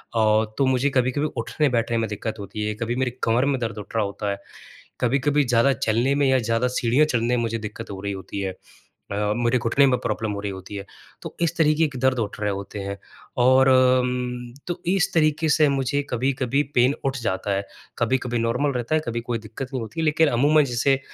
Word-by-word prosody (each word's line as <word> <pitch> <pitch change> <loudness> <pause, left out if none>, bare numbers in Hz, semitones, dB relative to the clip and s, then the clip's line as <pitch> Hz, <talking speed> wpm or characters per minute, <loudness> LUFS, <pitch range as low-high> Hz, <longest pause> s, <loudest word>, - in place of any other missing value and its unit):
औ 110 0 +3
तो 135 - +3
मुझे 130 +2 +2
कभी-कभी 130 +3 +1
उठने-बैठने 120 -2 0
में 110 - 0
दिक्कत 110 +1 -4
होती 105 +1 -5
है, 105 - -2
कभी 115 +3 -3
मेरी 130 -1 0
कमर 120 +4 +2
में 140 -2 0
दर्द 115 -2 -3
उठ 105 - -10
रहा 110 - +2
होता 100 +1 -4
है, 100 - -4 0.6
कभी-कभी 140 +4 +2
ज़्यादा 125 +2 +3
चलने 120 +5 +1
में 140 -1 +2
या 130 -1 +4
ज़्यादा 115 +2 0
सीढ़ियाँ 125 +4 +2
चढ़ने 120 -3 0
में - - 0
मुझे 115 0 -1
दिक्कत 110 +1 -7
हो 95 - -6
रही 100 0 -3
होती 95 +1 -6
है 95 -1 -2 0.4
अ, 105 +1 -3
मेरे 120 +1 +2
घुटने 125 +5 +3
में 125 -1 +2
प्रॉब्लम 110 -1 -2
हो 100 - -4
रही 100 -1 -3
होती 95 +2 -9
है। 100 0 -6 0.4
तो - - -8
इस 170 0 +1
तरीके 155 0 +3
के 135 - -8
दर्द 130 -1 +2
उठ 105 -2 -3
रहे 105 -1 +1
होते 100 +1 -6
हैं 100 0 -4 0.5
और 130 +1 +5
अम, 125 -1 +2
तो 175 - -4
इस 195 +1 +1
तरीके 155 -1 +2
से 150 -1 +4
मुझे 140 +1 0
कभी-कभी 130 +2 0
पेन 125 +3 +4
उठ 135 0 0
जाता 100 -1 -2
है। 100 0 -2 0.3
कभी-कभी 120 0 0
नॉर्मल 115 +5 0
रहता 125 +5 -1
है, 155 - +2
कभी 120 0 -2
कोई 120 0 -2
दिक्कत 115 +4 -7
नहीं 130 - -2
होती 135 +9 -7
है, - - 0
लेकिन 155 +1 +3
अमूमन 145 +5 +4
जैसे 135 +2 +1
125 Hz, 215 wpm, -23 LUFS, 110-135 Hz, 0.6 s, और